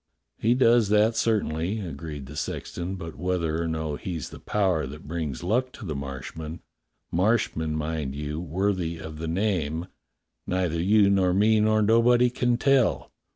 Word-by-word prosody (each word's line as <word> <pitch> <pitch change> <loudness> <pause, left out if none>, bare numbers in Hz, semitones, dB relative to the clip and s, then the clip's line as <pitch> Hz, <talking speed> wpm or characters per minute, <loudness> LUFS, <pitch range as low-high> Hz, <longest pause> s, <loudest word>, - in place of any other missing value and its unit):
^^" - - -31
"He 115 +3 +4
does 120 -4 +4
that 105 +2 +4
certainly," 105 -4 0
agreed 75 -5 -6
the 75 +3 -10
sexton. 85 +4 -4
"But 80 -3 -7
whether 85 -3 -1
or 85 - -1
no 80 -2 -2
he's 85 -6 -5
the - - -10
power 95 -6 +1
what 75 +2 -10
brings 80 -3 -4
luck 125 +7 +1
to - - -9
the 80 - -3
Marshmen 70 +4 -6 0.3
— - - -51
Marshmen, 85 -5 +1
mind 75 -3 -3
you, 75 +1 -4
worthy 90 0 -1
of 80 -1 -8
the 80 - -3
name 85 -3 -1 0.3
— - - -53
neither 90 -3 0
you 100 +2 +4
nor 95 -2 +3
me 110 +2 +4
nor 110 0 +3
nobody 120 +3 +4
can 120 -1 +1
tell. 135 -1 +2
90 Hz, 170 wpm, -26 LUFS, 80-110 Hz, 0.3 s, He